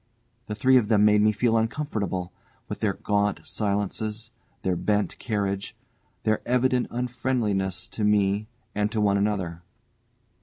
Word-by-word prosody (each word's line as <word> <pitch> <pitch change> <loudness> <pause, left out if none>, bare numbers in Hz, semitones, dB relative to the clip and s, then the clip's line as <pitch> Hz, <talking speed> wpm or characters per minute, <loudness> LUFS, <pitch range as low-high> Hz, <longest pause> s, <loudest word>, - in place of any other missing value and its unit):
The 105 - -3
three 130 +5 +5
of 115 -4 +2
them 105 -1 +4
made 105 0 +5
me 105 0 +5
feel 115 +2 +1
uncomfortable, 110 - -1 0.3
with - - -5
their - - +1
gaunt 105 0 0
silences, 105 +2 -2 0.3
their 95 -1 +1
bent 105 +3 0
carriage, 100 -4 -2 0.5
their 110 0 +1
evident 125 0 +2
unfriendliness 120 -6 -1
to 110 - -4
me 105 0 +2 0.3
and 105 +1 0
to 110 - -1
one 100 -1 +3
another. 95 -5 -1
105 Hz, 140 wpm, -26 LUFS, 100-115 Hz, 0.5 s, three